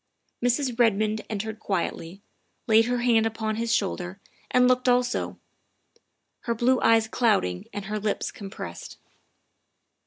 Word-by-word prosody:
Mrs. 245 0 0
Redmond 215 -1 +2
entered 220 +1 -4
quietly, 190 -1 -3 0.4
laid 225 0 +5
her 245 0 -1
hand 230 -2 +3
upon 220 -1 -3
his 230 0 -1
shoul 200 -4 +1
der, 185 +2 -7 0.3
and 250 0 +4
looked 255 0 +3
also, 245 0 +1 1.1
her 235 - 0
blue 250 +3 +2
eyes 225 -1 +4
clouding 205 - +1
and 205 -1 -6
her 215 +1 -3
lips 210 0 -2
compressed. 195 - -8
220 Hz, 130 wpm, -26 LUFS, 205-240 Hz, 1.1 s, laid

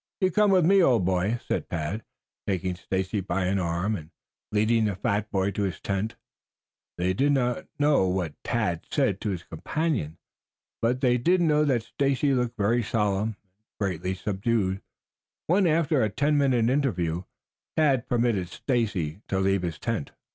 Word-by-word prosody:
"You 185 -1 +2
come 210 +3 +4
with 185 -4 +4
me, 195 +2 +5
old 120 - +4
boy," 95 +5 +1
said - - -2
Tad, 85 +7 -3 0.4
taking 95 -2 -1
Stacy 95 +3 -2
by 95 0 -1
an 95 +2 +1
arm 85 +4 0
and 80 -4 -8 0.4
leading 110 +1 +2
the 105 -2 -1
fat 100 +2 -1
boy 95 0 0
to 105 - -3
his 95 -3 -2
tent. 100 +2 -2 0.8
They 90 +1 +1
did 140 +8 +2
not 125 -3 0
know 145 -9 +3
what 90 -4 -1
Tad 105 -8 -1
said - - +1
to 110 - -1
his 90 -3 -3
companion, 110 - -2 0.6
but 125 +3 +1
they 125 -2 +3
did 180 +9 +3
know 150 -3 +3
that 125 -6 +1
Stacy 140 +2 +1
looked 125 -2 -1
very 115 +4 +2
solemn 105 -1 0
and 100 +3 -48
greatly 95 -2 -1
subdued, 100 0 -1 0.6
when, 185 +2 +3
after 155 -3 +2
a 110 - +2
ten 145 +8 +1
minute 130 -5 +3
interview, 90 - 0 0.6
Tad 140 -6 +3
permitted 115 -7 +1
Stacy 100 - -1
to 95 - -1
leave 95 0 +2
the 85 -1 -1
tent. 105 +1 -4
110 Hz, 165 wpm, -26 LUFS, 95-130 Hz, 0.8 s, me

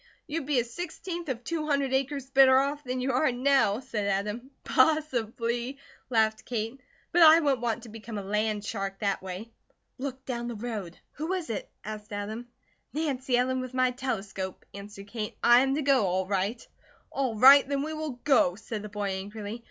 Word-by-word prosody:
"You'd 300 -2 -4
be 285 -4 +3
a - - +2
sixteenth 340 +5 -6
of 245 -2 -3
two 315 0 -3
hundred 280 -3 +1
acres 270 0 -1
better 265 -1 +7
off 285 +2 0
than 255 -1 -3
you 265 +1 0
are 260 +2 +2
now," 250 -4 +3
said 210 -5 -3
Adam. 210 +6 -2
"Possibly," 250 -3 +1 0.3
laughed 220 -2 +2
Kate, 235 +2 -4 0.3
"but 350 - +3
I 320 0 +9
wouldn't 280 -6 +1
want 230 -2 -1
to 235 - -10
become 220 0 -7
a 200 - -4
land 210 +1 -1
shark 195 -2 -3
that 200 -2 0
way. 190 +5 -7 0.5
Look 265 0 -5
down 240 -2 -3
the 240 - -4
road." 210 -6 -5
"Who 320 +5 -3
is 355 -9 -3
it?" 210 - -4
asked 215 0 -7
Adam. 215 +4 -5 0.5
"Nancy 270 -5 0
Ellen, 260 +1 +1
with 255 0 -7
my 255 -1 +3
telescope," 200 -7 -4
answered 200 0 -9
Kate. 215 -1 -5
"I 240 0 +8
am 270 +1 +2
to 305 - -1
go, 270 -4 +4
all 185 +1 0
right." 200 +4 -2 0.4
"All 265 -4 -1
right, 270 +4 +8
then 280 -1 0
we 315 +1 -4
will 305 -5 -5
go," 245 -11 +4
said 220 0 -6
the 210 - -7
boy, 205 -1 -3
angrily. 205 +3 -5
245 Hz, 190 wpm, -28 LUFS, 210-275 Hz, 0.5 s, I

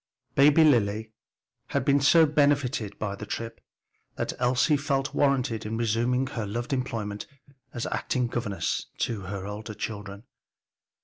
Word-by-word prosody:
Baby 145 +3 +6
Lily 110 -6 +2 0.5
had - - -1
been 140 0 +4
so 160 +4 +6
benefited 140 -7 +1
by 100 -2 -3
the 105 +1 -8
trip 115 0 -5 0.5
that - - -2
Elsie 130 +5 +3
felt 140 -1 -1
warranted 135 -5 +1
in 110 +1 -3
resuming 120 +3 +1
her 115 -5 -4
loved 120 +7 -3
employment 115 -6 -3 0.4
as 120 - -4
acting 125 -1 -1
governess 115 -4 -2
to 110 -4 -2
her 95 0 -5
older 105 +1 -6
children. 100 -1 -6
120 Hz, 135 wpm, -27 LUFS, 105-140 Hz, 0.5 s, Baby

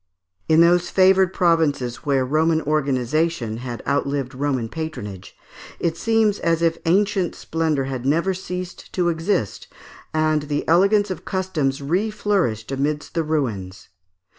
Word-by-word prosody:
In 160 +1 +6
those 175 +1 +4
favoured 190 -1 +4
provinces 160 -9 +1
where 135 -3 0
Roman 160 +4 +2
organization 140 -3 0
had 120 -1 -6
outlived 140 -2 -1
Roman 130 -3 -1
patronage, 110 - -7 0.4
it 165 -1 0
seems 220 +1 +1
as 165 0 +1
if 165 0 +1
ancient 190 0 +2
splendour 160 -4 -1
had 130 -2 -4
never 165 +8 +1
ceased 180 -1 -7
to 175 -2 +1
exist, 165 - -1 0.4
and 155 -1 +1
the 145 0 -2
elegance 200 +4 +3
of 185 - -6
customs 155 -8 -2
re 180 +10 0
flourished 185 - -1
amidst 145 +2 -2
the 165 - +1
ruins. 110 -11 -3
160 Hz, 135 wpm, -22 LUFS, 135-180 Hz, 0.4 s, In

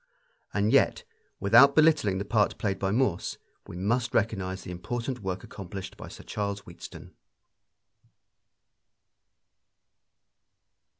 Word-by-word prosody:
And 105 +1 +1
yet, - - +3 0.4
without 120 +8 +6
belittling 155 -12 +4
the 100 - -3
part 105 -1 +1
played 100 -2 -2
by 95 - 0
Morse, 105 -4 0 0.3
we - - -8
must 115 +6 0
recognize 95 -3 -1
the - - -7
important 120 +8 -4
work 95 -2 -4
accomplished 95 0 -8
by - - -9
Sir - - -11
Charles 100 -1 -3
Wheatstone. 85 -3 -11
100 Hz, 110 wpm, -28 LUFS, 95-115 Hz, 0.4 s, without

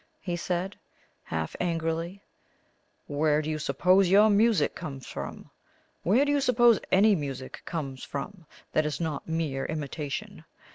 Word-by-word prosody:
he 175 -3 -3
said, 180 +2 -2 0.5
half 80 -1 -3
angrily. 165 +2 -2 0.8
"Where 150 +1 +2
do 155 - -2
you 155 - -2
suppose 180 +7 +3
your 210 +3 +6
music 205 -5 +3
comes 140 -7 -7
from? - - -7 0.5
Where 235 +10 +3
do 290 - +1
you 290 -1 +2
suppose 240 -4 +5
any 205 +3 +6
music 135 -6 -4
comes 140 -6 -4
from 160 +4 -6 0.2
that 155 0 +2
is 150 - -3
not 160 -4 -3
mere 155 -5 -1
imitation? 150 -2 -5
165 Hz, 140 wpm, -28 LUFS, 145-195 Hz, 0.8 s, your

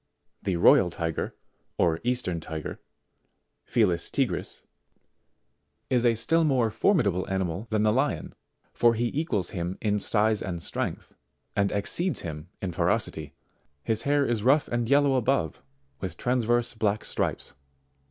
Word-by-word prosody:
74: 95 - -2
The 90 - 0
Royal 90 +1 +6
Tiger, 80 -2 -3 0.4
or 80 -2 +2
Eastern 120 -9 -1
Tiger, 80 -1 -6 0.9
Felis 90 -7 +1
Tigris, - - -1 1.3
is 125 -1 +3
a 115 - +3
still 165 +9 +2
more 130 -7 +2
formidable 105 - +1
animal 95 +2 -2
than 110 -1 +1
the 105 0 +3
Lion, - - -1 0.4
for 120 -1 +4
he 120 +1 0
equals 115 - -1
him 90 0 -3
in 105 -1 0
size 110 +1 +2
and 90 -3 -4
strength, - - -3 0.4
and 100 -1 +2
exceeds 170 - 0
him 80 0 -7
in 95 - -1
ferocity; 85 -4 -1 0.5
his 110 -1 0
hair 145 +2 +2
is 120 -4 0
rough 135 +6 +3
and 120 -1 -1
yellow 140 0 +4
above 130 - 0 0.4
with 90 -2 -5
transverse 120 -1 +1
black 110 -2 -1
stripes. - - -2
110 Hz, 140 wpm, -27 LUFS, 90-120 Hz, 1.3 s, Royal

